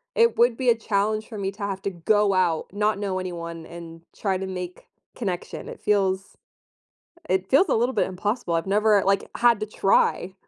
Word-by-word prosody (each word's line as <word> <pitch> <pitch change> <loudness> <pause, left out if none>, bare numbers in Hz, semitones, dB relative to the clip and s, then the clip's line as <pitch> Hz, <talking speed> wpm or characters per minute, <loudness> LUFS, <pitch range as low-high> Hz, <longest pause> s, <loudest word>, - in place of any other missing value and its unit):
it 465 0 +4
would 240 0 +4
be 255 -2 +1
a 235 - +5
challenge 215 0 -1
for 220 - -8
me 195 -1 -1
to 200 +1 -9
have 195 -1 -3
to - - 0
go 200 +3 +2
out, 175 -4 +1
not 210 +1 0
know 195 -2 -2
anyone, 170 -2 -6
and 165 -1 -10 0.2
try 195 -3 -1
to 190 - -4
make 180 -1 -6 0.3
connection. 185 -7 -4
It - - -10
feels 195 -2 0 0.9
it 190 0 0
feels 330 +8 +5
a - - +2
little 240 +3 +1
bit - - +2
impossible. 190 0 -2
I've 165 +1 0
never, 210 +1 +3
like, 195 0 +1
had 235 -2 +4
to 215 - -2
try. 195 -2 +1
195 Hz, 195 wpm, -24 LUFS, 185-215 Hz, 0.9 s, a